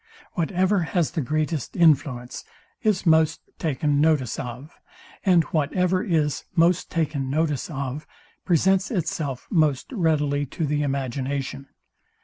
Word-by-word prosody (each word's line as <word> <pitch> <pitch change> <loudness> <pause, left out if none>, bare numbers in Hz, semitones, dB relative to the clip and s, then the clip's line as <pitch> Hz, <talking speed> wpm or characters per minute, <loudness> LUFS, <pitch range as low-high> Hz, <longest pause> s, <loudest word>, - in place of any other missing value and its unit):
Whatever 185 +3 +1
has 170 -1 0
the 165 - -2
greatest 155 +1 -2
influence 140 -7 +2 0.4
is 210 -6 +1
most 160 -2 +4 0.2
taken 145 -1 0
notice 150 -4 +2
of; 130 +2 -7 0.5
and 180 -4 +5
whatever 180 +4 +1
is 155 - 0
most 170 +1 +3
taken 150 -5 -1
notice 150 -1 0
of, 140 0 -5 0.4
presents 190 +3 +2
itself 155 - -3
most 155 - +1
readily 150 - +1
to 160 - -3
the 150 0 0
imagination. 135 0 -3
155 Hz, 120 wpm, -24 LUFS, 140-170 Hz, 0.5 s, and